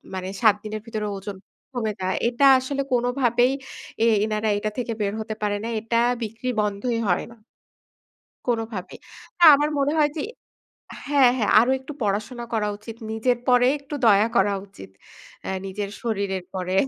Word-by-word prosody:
মানে, 185 0 -4
৭ 215 -3 +6
দিনের 215 0 -5
ভিতরে 215 -2 -3
ওজন 195 +1 -7 0.4
কমে 220 -3 -1
যায়। 185 0 0
এটা 245 +3 +2
আসলে 275 +2 -3
কোনভাবেই, 245 0 +2 0.5
এই 230 - +5 0.2
এনারা 215 0 -1
এটা 215 +1 -2
থেকে 240 -2 -2
বের 200 0 0
হতে 215 0 -5
পারে 205 0 0
না 230 - -3
এটা 230 +1 -1 0.3
বিক্রি 225 +4 -4
বন্ধই 210 +3 -1
হয় 175 - +1
না - - -14 1.1
কোনোভাবে। 225 -6 -3 0.4
না, 345 - +3
আমার 295 +1 0
মনে 280 +1 +2
হয় 295 -1 +4
যে - - -1 0.9
হ্যা, 280 -2 +4
হ্যা। 215 - +1
আরো 245 +3 +2
একটু 265 +3 -9
পড়াশোনা 215 +4 -2
করা 215 -2 0
উচিত, 220 +2 -10 0.2
নিজের 240 +2 +1
পরে 245 0 +5
একটু 280 +1 -9
দয়া 210 0 +6
করা 200 +1 +3
উচিত। 95 - -13 0.5
অ্যা - - -3
নিজের 200 +1 -4
শরীরের 200 -5 -2
উপরে 185 -1 -4
220 Hz, 165 wpm, -24 LUFS, 205-245 Hz, 1.1 s, ৭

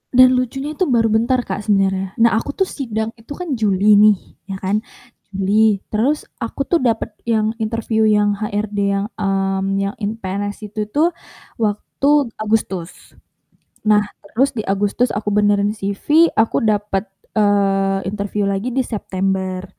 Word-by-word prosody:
Dan 255 0 +7
lucunya 270 +4 -3
itu 355 +4 -1
baru 230 -4 +2
bentar, 240 +3 +2
Kak, 210 - -5
sebenernya. 195 -2 +1
Nah 230 - +5
aku 285 - -6
tuh 385 - +2
sidang 220 -7 -3
itu 230 +6 -9
kan 350 -6 -3
Juli 205 0 +4
nih. 210 0 +7 0.3
Ya 195 - -4
kan? 195 +3 0 0.6
Juli, 205 +1 +2
terus 260 +8 +1 0.2
aku 230 +4 -3
tuh 340 +4 +1
dapet 230 -4 0 0.2
yang 220 -2 +2
interview 220 0 0
yang 210 -1 +3
HRD 210 0 -3 0.2
yang, 195 0 -1
mmm, 195 -1 0
yang 195 +1 -1
in 210 +1 -2
PNS 205 0 -5
itu 210 0 -3
tuh, 305 +10 +2 0.5
waktu 245 +5 +1
Agustus. 205 -5 -3 0.7
Nah 210 -1 +5 0.3
terus 270 +3 +3
di 220 - -4
Agustus 205 +5 +1
aku 210 0 -2
benerin 205 0 +2
CV, 215 +11 +2
aku 220 0 +2
dapet, 210 -2 0 0.2
eee, 195 -2 +2
interview 205 0 -2
lagi 200 +5 -1
di 265 - +2
September. 190 -4 -2
210 Hz, 150 wpm, -19 LUFS, 200-230 Hz, 0.7 s, Dan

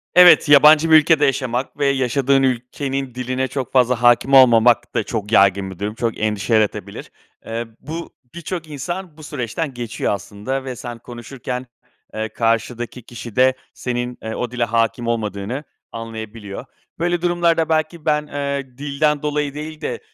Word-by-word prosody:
Evet, 180 -3 +8
yabancı 150 +2 +7
bir - - +9
ülkede 155 -1 +4
yaşamak 130 -1 -1
ve 145 - 0
yaşadığın 135 0 +2
ülkenin 130 +1 -2
diline 130 +1 -2
çok 130 0 -4
fazla 125 -2 +3
hâkim 120 +3 +4
olmamak 120 -2 +5
da 115 - +1
çok 105 -1 -4
yaygın 95 -2 +4
bir 90 - -12
durum. 105 +1 -3
Çok 115 -1 -2
endişe 105 +1 -1
yaratabilir. 110 -2 -1 0.3
Eee, 115 +1 -4
bu, 160 +4 -7 0.2
birçok 170 0 -5
insan 160 +3 -6
bu 155 - -12
süreçten 140 +1 -4
geçiyor 120 -4 -2
aslında 105 +7 -4
ve 130 -1 -5
sen 120 0 -7
konuşurken, 125 +1 -7 0.5
eee, 110 0 -3
karşıdaki 115 +2 -1
kişi 115 -1 -10
de 130 +1 +5 0.2
senin, 125 0 -4
eee, 110 0 -4
o 120 -1 -3
dile 125 -1 -1
hâkim 115 +1 0
olmadığını 110 +3 -3 0.3
anlayabiliyor. 110 -1 -7 0.3
Böyle 175 0 0
durumlarda 170 -2 +1
belki 155 0 -1
ben, 150 -1 +1
eee, 140 -3 -4
dilden 145 +1 0
dolayı 150 -1 -1
değil 155 +1 -7
de, 120 -5 -3
125 Hz, 155 wpm, -20 LUFS, 115-145 Hz, 0.5 s, bir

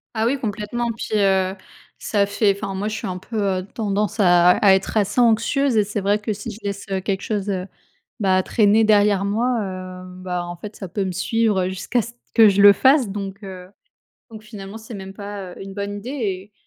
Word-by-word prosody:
Ah 220 0 +1
oui, 270 +4 +1
complètement. 225 +1 -3
Puis, 215 -1 -2
heu, 190 -1 +2 0.4
ça 205 -2 +1
fait 200 0 +1
Enfin, 200 0 -5
moi, 195 +2 -3
je 215 - -3
suis 205 - -5
un 185 -1 -4
peu, 220 +4 -5 0.2
heu, 185 - -7
tendance 210 0 -2
à 175 -2 +6
à 195 +1 +5
être 190 +3 0
assez 210 +4 +2
anxieuse 240 +3 +2
et 210 - +5
c'est 205 0 -4
vrai 200 +2 +2
que, 210 +1 -3
si 205 +3 -7
je 205 - -10
laisse, 200 -1 -4
heu, 190 -1 -1
quelque 195 0 -2
chose, 205 -1 -3
heu, 185 -1 -2 0.5
bah, 190 -2 +3
traîner 215 +1 +3
derrière 205 -2 +4
moi, 235 +5 0
hem, 185 -1 -7
bah, 180 -1 -3
en 175 0 -6
fait, 210 +4 -9
ça 190 - -7
peut 195 +2 -2
me 190 - -2
suivre 200 0 +1
jusqu'à 195 +6 -1
ce 235 - -8 0.2
que 225 -2 +7
je 200 0 +2
le 205 0 +9
fasse. 265 +1 +4
Donc 195 0 -6
heu, 185 -2 -9 0.6
donc 220 -1 -10
finalement, 210 -1 -9
c'est 220 +1 -10
même 195 -1 -8
pas, 200 -2 -7
heu, - - -12
une 195 0 -9
bonne 200 0 -4
idée. 225 +5 -7
Et 205 -7 -4
200 Hz, 220 wpm, -21 LUFS, 190-220 Hz, 0.6 s, le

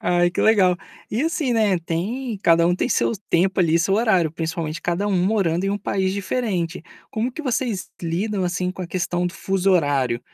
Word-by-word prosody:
Ai, 175 0 +2
que 175 - -2
legal. 190 -5 +4 0.3
E 225 +5 0
assim, 320 -5 0
né, 215 -5 +2
tem 205 +8 -3
cada 170 0 +5
um 175 - +3
tem 215 - -1
seu - - +1 0.2
tempo 185 +3 +2
ali, 165 -1 +3
seu 185 +3 +1
horário, 200 -7 +2
principalmente 160 0 -4
cada 175 +4 -1
um 205 - 0
morando 190 -4 +1
em 195 - +1
um 205 - -1
país 190 -2 -1
diferente. 190 -5 -2 0.3
Como 230 +4 -2
que 315 - -6
vocês 245 - -2
lidam, 185 +4 -1
assim, 180 +1 -1
com 185 0 -7
a - - -5
questão 175 0 -1
do 175 - -4
fuso 195 0 0
horário? 140 -9 +2
185 Hz, 195 wpm, -22 LUFS, 170-210 Hz, 0.3 s, cada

